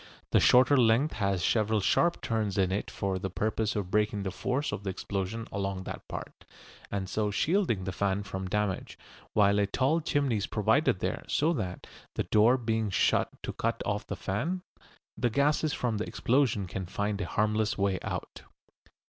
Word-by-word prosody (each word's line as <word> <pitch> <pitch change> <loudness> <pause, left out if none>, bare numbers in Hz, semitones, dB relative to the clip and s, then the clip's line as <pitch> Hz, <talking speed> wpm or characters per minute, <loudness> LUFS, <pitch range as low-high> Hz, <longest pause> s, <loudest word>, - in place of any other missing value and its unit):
The - - +5
shorter 125 +3 +6
length 125 +5 +3
has 100 -4 0
several 110 -1 +2
sharp 170 - +2
turns 110 -3 -1
in 95 -1 +2
it 100 - -2
for 95 -1 -2
the 95 0 -3
purpose 110 +3 -1
of 100 -3 -3
breaking 105 -1 +1
the 95 - -2
force 130 +9 -1
of 100 - -5
the 100 - -2
explosion 100 +3 -4
along 95 -1 -3
that - - -7
part, - - -8 0.5
and 95 -2 -3
so 105 +1 0
shielding 150 - +1
the 95 - -3
fan 100 +2 0
from 95 -1 -5
damage, 105 -1 -2 0.4
while 100 -1 +4
a 100 - +2
tall 135 +10 +1
chimney 140 -6 +1
is 100 - -2
provided 110 - +2
there, - - -2
so 160 +3 +2
that, 95 - -4 0.3
the - - 0
door 110 +7 +4
being 110 -3 -1
shut 95 - +2
to - - -4
cut - - -2
off - - -2
the - - -3
fan, 170 - -2 0.5
the 120 - +1
gases 145 +5 +2
from 120 -6 -1
the 110 - -2
explosion 125 -5 +1
can 95 0 -5
find 100 +2 -2
a 90 - -3
harmless 105 +2 0
way 100 -2 +1
out. - - -5
105 Hz, 180 wpm, -29 LUFS, 95-120 Hz, 0.5 s, shorter